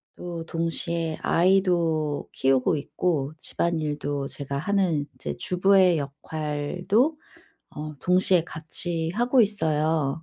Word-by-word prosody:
또 170 -2 -6
동시에 165 -1 -2
아이도 170 -5 +2
키우고 135 +3 +2
있고 150 0 -1
집안일도 150 -4 -2
제가 140 -1 -5
하는 170 -2 +1
이제 130 - -5
주부의 185 +3 +4
역할도 155 - -1 0.5
어 150 0 -7
동시에 180 -1 +3
같이 165 +1 -3
하고 245 +3 +3
있어요. 160 -7 0
160 Hz, 230 characters per minute, -25 LUFS, 150-180 Hz, 0.5 s, 주부의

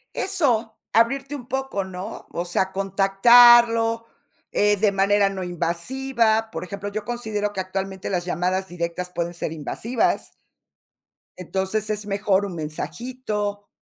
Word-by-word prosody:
Eso, 240 - +1 0.2
abrirte 270 +6 +2
un 250 -3 -9
poco, 265 -6 -2
¿no? 185 0 -8
O 170 - -2
sea, 190 +2 0
contactarlo, 230 +4 +5 0.5
eh, 210 0 +3
de 205 0 +3
manera 200 +1 +3
no 195 -1 -5
invasiva. 220 +7 0
Por - - -5
ejemplo, 200 +2 -6
yo 210 0 -4
considero 215 -3 -3
que 190 - -2
actualmente 190 0 -4
las 180 -2 -1
llamadas 185 +2 -1
directas 175 +1 -4
pueden 170 -1 -3
ser 165 -2 -4
invasivas. 220 - -1 1.1
Entonces, 190 +4 -2
es 210 -1 -2
mejor 200 -1 +1
un 190 -3 -6
mensajito, 205 +5 -4
205 Hz, 130 wpm, -23 LUFS, 185-230 Hz, 1.1 s, contactarlo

